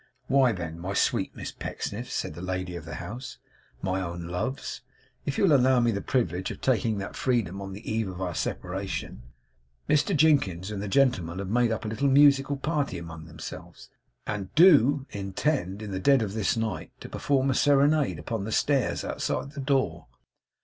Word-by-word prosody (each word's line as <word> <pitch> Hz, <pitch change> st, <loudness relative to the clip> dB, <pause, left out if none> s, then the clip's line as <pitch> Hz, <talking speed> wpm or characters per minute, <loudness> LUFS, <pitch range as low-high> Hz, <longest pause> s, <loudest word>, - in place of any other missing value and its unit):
'Why, 135 Hz, -2 st, +4 dB
then, 85 Hz, -5 st, -5 dB
my 95 Hz, +3 st, -4 dB
sweet -, -, +1 dB
Miss -, -, -6 dB
Pecksniffs,' -, -, -5 dB
said -, -, -2 dB
the 85 Hz, -, -9 dB
lady 90 Hz, -1 st, -3 dB
of 85 Hz, -, -7 dB
the 80 Hz, -1 st, -6 dB
house; 110 Hz, +10 st, -7 dB, 0.5 s
'my 95 Hz, 0 st, 0 dB
own 85 Hz, -1 st, -5 dB
loves, 90 Hz, +11 st, -4 dB, 0.5 s
if 140 Hz, -, -1 dB
you -, -, +2 dB
will 165 Hz, -7 st, +6 dB
allow 130 Hz, -1 st, +4 dB
me 120 Hz, -1 st, +3 dB
the 100 Hz, -2 st, -2 dB
privilege 95 Hz, -8 st, -1 dB
of -, -, -7 dB
taking 115 Hz, -4 st, +1 dB
that 100 Hz, 0 st, -5 dB
freedom 105 Hz, -7 st, 0 dB
on 95 Hz, 0 st, -6 dB
the 105 Hz, +4 st, -10 dB
eve 110 Hz, -1 st, 0 dB
of 95 Hz, -1 st, -7 dB
our 90 Hz, -2 st, -2 dB
separation, 95 Hz, -7 st, -4 dB, 0.7 s
Mr 155 Hz, +4 st, +2 dB
Jinkins 105 Hz, -, +3 dB
and 100 Hz, -2 st, -4 dB
the 105 Hz, -, -4 dB
gentlemen 100 Hz, -8 st, +2 dB
have 95 Hz, -1 st, -4 dB
made 120 Hz, +1 st, +2 dB
up 110 Hz, +1 st, -3 dB
a -, -, -2 dB
little 125 Hz, +6 st, 0 dB
musical 140 Hz, 0 st, +5 dB
party 145 Hz, -, -1 dB
among 80 Hz, -1 st, -8 dB
themselves, 80 Hz, -1 st, -10 dB, 0.3 s
and 100 Hz, -3 st, -4 dB
DO 145 Hz, -5 st, +6 dB
intend, 100 Hz, -, -2 dB
in 105 Hz, -, -6 dB
the 95 Hz, -, -2 dB
dead 135 Hz, +4 st, +4 dB
of 100 Hz, -2 st, -4 dB
this 110 Hz, 0 st, 0 dB
night, 110 Hz, -2 st, -3 dB
to -, -, -8 dB
perform 135 Hz, -1 st, +1 dB
a -, -, +2 dB
serenade 145 Hz, -, +3 dB
upon 100 Hz, +7 st, -4 dB
the 110 Hz, -, -4 dB
stairs 135 Hz, +2 st, +1 dB
outside 140 Hz, -, -2 dB
the 145 Hz, -1 st, -6 dB
door. 130 Hz, -, 0 dB
110 Hz, 190 wpm, -27 LUFS, 95-135 Hz, 0.7 s, will